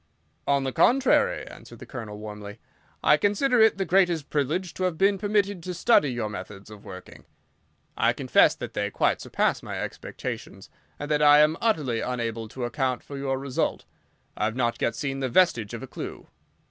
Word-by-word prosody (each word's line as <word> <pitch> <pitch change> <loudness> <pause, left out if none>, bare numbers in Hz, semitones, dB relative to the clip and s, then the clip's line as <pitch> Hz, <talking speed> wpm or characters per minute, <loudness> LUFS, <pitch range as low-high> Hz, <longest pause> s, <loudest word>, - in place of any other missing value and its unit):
"On 140 -1 +2
the 135 - -2
contrary," 260 - +3
answered - - -12
the - - -11
Colonel, 110 -5 -7
warmly, 105 -1 -8 0.5
"I 150 - +5
consider 225 - +2
it 220 -2 +5
the 195 - -1
greatest 175 -5 +2
privilege 155 +6 -1
to 185 - -4
have 180 -3 -1
been 195 +1 +3
permitted 205 -2 0
to 180 +1 -5
study 170 - +3
your 120 -3 -2
methods 100 0 -9
of 105 -2 -12
working. 90 -1 -11 0.7
I - - +3
confess - - +3
that - - -7
they - - -1
quite - - 0
surpass - - 0
my - - -6
expectations, - - -7 0.3
and 145 +1 -6
that 150 0 +2
I 145 0 +7
am 155 +1 +4
utterly 145 - 0
unable 115 -3 -3
to 120 +3 -5
account 130 -1 -2
for 140 - -9
your 135 -1 -2
result. 135 -1 -2 0.5
I 105 - -1
have 110 +1 -2
not 120 -2 -1
yet 115 - 0
seen 135 0 -3
the 130 -1 -1
vestige 120 - +2
of 115 - -7
a - - -7
clue." - - -8
140 Hz, 185 wpm, -26 LUFS, 115-180 Hz, 0.7 s, I